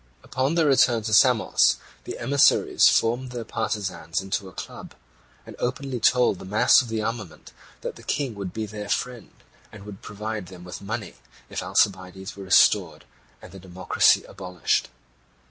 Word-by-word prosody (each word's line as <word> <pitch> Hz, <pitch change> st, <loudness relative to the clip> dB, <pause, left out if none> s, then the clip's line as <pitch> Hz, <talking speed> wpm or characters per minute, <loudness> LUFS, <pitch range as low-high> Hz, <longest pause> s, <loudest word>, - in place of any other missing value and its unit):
Upon 135 Hz, +5 st, -1 dB
their 165 Hz, -2 st, +3 dB
return 130 Hz, -5 st, +3 dB
to 110 Hz, 0 st, -3 dB
Samos 115 Hz, +1 st, +4 dB, 0.3 s
the -, -, -6 dB
emissaries 135 Hz, +4 st, +4 dB
formed 120 Hz, +3 st, +1 dB
their 120 Hz, -2 st, -5 dB
partisans 95 Hz, -7 st, -3 dB
into 95 Hz, 0 st, -4 dB
a -, -, -15 dB
club, -, -, -9 dB, 0.5 s
and -, -, -11 dB
openly 125 Hz, 0 st, -3 dB
told 120 Hz, -3 st, +3 dB
the -, -, -10 dB
mass 105 Hz, +8 st, +4 dB
of 125 Hz, -, -7 dB
the 110 Hz, -1 st, -3 dB
armament 110 Hz, -6 st, -6 dB, 0.3 s
that -, -, -6 dB
the -, -, -13 dB
King 135 Hz, -4 st, -2 dB
would 100 Hz, -3 st, -6 dB
be 110 Hz, +3 st, -4 dB
their 105 Hz, -1 st, -8 dB
friend, 125 Hz, +2 st, -3 dB, 0.4 s
and 105 Hz, -2 st, -12 dB
would 105 Hz, -2 st, -10 dB
provide 105 Hz, -1 st, -6 dB
them 90 Hz, -1 st, -12 dB
with 90 Hz, +1 st, -9 dB
money, 110 Hz, +2 st, -6 dB, 0.3 s
if -, -, -3 dB
Alcibiades 95 Hz, -1 st, -1 dB
were 100 Hz, -1 st, -9 dB
restored 95 Hz, -, +3 dB, 0.4 s
and -, -, -12 dB
the 95 Hz, -, -11 dB
democracy 95 Hz, 0 st, +2 dB
abolished. 90 Hz, -3 st, -2 dB
105 Hz, 165 wpm, -24 LUFS, 95-120 Hz, 0.5 s, Samos